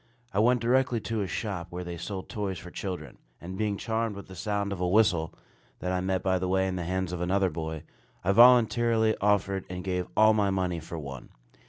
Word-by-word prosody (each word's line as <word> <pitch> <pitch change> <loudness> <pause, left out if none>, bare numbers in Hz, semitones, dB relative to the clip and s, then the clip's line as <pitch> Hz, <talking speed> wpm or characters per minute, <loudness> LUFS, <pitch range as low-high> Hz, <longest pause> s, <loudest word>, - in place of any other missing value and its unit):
I 100 - +1
went 120 +2 +4
directly 125 0 +2
to 110 +2 -2
a 100 - -2
shop 95 -2 -4
where 90 0 -5
they 85 0 -6
sold 95 +3 -6
toys 100 -3 -3
for 90 +3 -10
children; 95 -3 -6 0.2
and 90 +2 -7
being 105 0 -1
charmed 115 -1 -2
with 100 - -8
the 95 - -9
sound 100 0 -2
of 95 - -6
a 90 - +1
whistle, 90 -5 +3 0.5
that 90 - -3
I 90 0 0
met 95 0 -1
by 95 -1 +2
the 95 - -2
way 95 +1 +2
in 95 - -2
the 90 -2 -3
hands 95 0 -2
of 90 - -4
another 95 +1 +1
boy, 80 0 -5 0.4
I 95 - +2
voluntarily 115 -1 +5
offered 100 -2 +1
and 90 0 -5
gave 90 -1 -2
all 110 0 +7
my 105 -2 +2
money 90 -3 -1
for 80 +1 -7
one. 70 -4 -8
95 Hz, 220 wpm, -28 LUFS, 90-105 Hz, 0.5 s, all